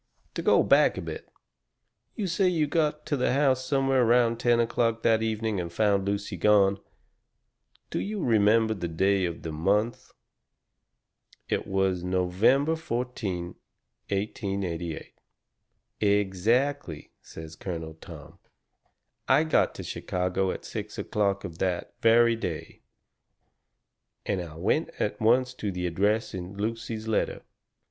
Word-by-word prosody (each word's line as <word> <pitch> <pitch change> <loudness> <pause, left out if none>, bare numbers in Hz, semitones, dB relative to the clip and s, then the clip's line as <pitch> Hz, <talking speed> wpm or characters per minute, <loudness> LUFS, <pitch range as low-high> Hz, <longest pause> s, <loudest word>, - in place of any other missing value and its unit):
"To - - -3
go - - +4
back - - +4
a - - -3
bit. - - -7 0.9
You 210 - -2
say 185 +2 +1
you 165 -4 +2
got 150 0 0
to 145 - 0
the 125 -2 +1
house 135 -2 +2
somewhere 135 -1 +2
around 120 -1 +3
ten 120 -1 +3
o'clock 115 -1 0
that 110 -1 +3
evening 110 -2 -1
and 85 -1 -4
found 100 0 +1
Lucy 100 -1 -2
gone. 100 +1 +4 1.1
Do - - -1
you 210 +1 -3
remember 110 0 +3
the 90 -5 -4
day 95 +3 +1
of 85 -1 -5
the 80 - -4
month?" 100 +9 0 1.4
"It - - -1
was 95 -2 0
November 95 - +2
14, 115 - -4 0.6
1888." 95 -4 -3 0.8
"Exactly," 105 - 0
says 80 0 -10
Colonel 80 -3 -6
Tom. 80 - -12 0.9
"I 155 - +5
got 155 - +2
to - - -7
Chicago 90 +1 -2
at - - -5
six - - -6
o'clock 100 -2 -1
of 85 -3 -8
that 90 -2 -2
very 115 +1 +5
day. 90 -9 -6 1.4
And 95 -3 -1
I 80 -3 -8
went 80 - 0
at - - -2
once 125 +3 +3
to 105 -5 -4
the 90 -1 -3
address 100 +6 0
in 95 +1 -7
Lucy's 110 +1 -4
letter. 110 - -1
105 Hz, 130 wpm, -27 LUFS, 90-120 Hz, 1.4 s, I